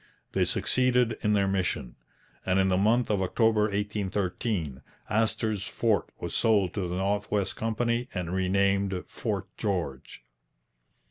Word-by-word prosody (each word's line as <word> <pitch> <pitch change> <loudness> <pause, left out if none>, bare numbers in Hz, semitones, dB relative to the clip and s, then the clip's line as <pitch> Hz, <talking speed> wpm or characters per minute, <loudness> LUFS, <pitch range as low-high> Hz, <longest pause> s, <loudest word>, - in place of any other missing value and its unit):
They - - +2
succeeded 125 -2 +2
in 105 -1 +2
their 100 -1 +3
mission, 90 -10 -1 0.5
and 95 0 +1
in 95 0 +3
the 90 - +3
month 110 +4 +3
of 100 -2 +1
October 110 +3 +3
1813 100 - -2 0.3
Astor's 110 -2 0
fort 110 -3 0
was - - -5
sold 105 -6 +3
to 95 -4 -2
the 90 - -3
North 100 +2 0
West 100 -2 0
Company 120 +2 -1
and 90 -2 -3
renamed 95 0 +1
Fort - - -3
George. 85 -10 -3
100 Hz, 135 wpm, -28 LUFS, 95-110 Hz, 0.5 s, their